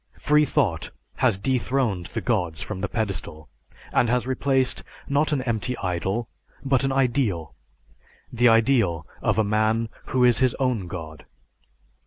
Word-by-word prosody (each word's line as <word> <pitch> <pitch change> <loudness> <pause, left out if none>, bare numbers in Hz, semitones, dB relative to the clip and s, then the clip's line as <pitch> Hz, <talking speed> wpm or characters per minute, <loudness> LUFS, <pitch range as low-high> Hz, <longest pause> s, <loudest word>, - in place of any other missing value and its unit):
Freethought 145 - +2 0.3
has - - +2
dethroned 125 -4 0
the 110 - -4
gods 90 -10 -1
from 100 -3 -6
the 100 - -1
pedestal, 95 -8 -4 0.4
and 120 - +3
has 125 0 +1
replaced, 130 0 +1 0.3
not 145 +3 +1
an 140 -4 0
empty 120 +1 -2
idol, 95 +5 -2 0.4
but 135 -1 +2
an 135 - +1
ideal, 125 - 0 0.8
the 120 +1 +4
ideal 115 - +3 0.2
of - - +1
a 110 - +4
man 110 +2 +1 0.2
who 130 -1 +1
is 120 -3 +5
his 130 -2 +3
own 125 -8 -1
god. 80 -4 -8
115 Hz, 140 wpm, -24 LUFS, 95-130 Hz, 0.8 s, is